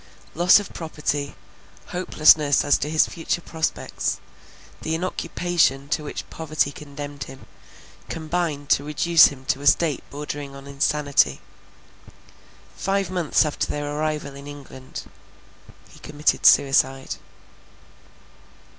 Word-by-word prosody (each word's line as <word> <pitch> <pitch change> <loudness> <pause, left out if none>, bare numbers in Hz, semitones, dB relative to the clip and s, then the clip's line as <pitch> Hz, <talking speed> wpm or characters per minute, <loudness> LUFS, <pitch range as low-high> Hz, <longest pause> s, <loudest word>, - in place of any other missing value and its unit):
Loss 175 +4 +6
of 205 - -8
property, 150 - -3 0.5
hopelessness 155 -5 +4
as 145 - +4
to 150 - -2
his 155 0 +4
future 165 +1 -3
prospects, 160 -1 -3 0.6
the 160 - -1
inoccupation 170 -5 0
to 155 0 -1
which 145 - -6
poverty 155 -3 -1
condemned 145 -1 -8
him, 135 0 -12 0.6
combined 160 -3 -2
to 140 - +4
reduce 155 +2 +5
him 130 -2 -9
to 135 +1 -1
a 145 - -2
state 150 0 +3
bordering 145 -1 -6
on 135 0 -11
insanity. 140 +1 +1 1.4
Five 195 -2 -1
months 175 -3 +2
after 150 - -2
their 145 0 -3
arrival 150 -2 -2
in 140 +1 -11
England, 135 -2 -9 0.9
he - - -16
committed 150 0 +1
suicide. 135 -1 +3
150 Hz, 115 wpm, -23 LUFS, 140-160 Hz, 1.4 s, Loss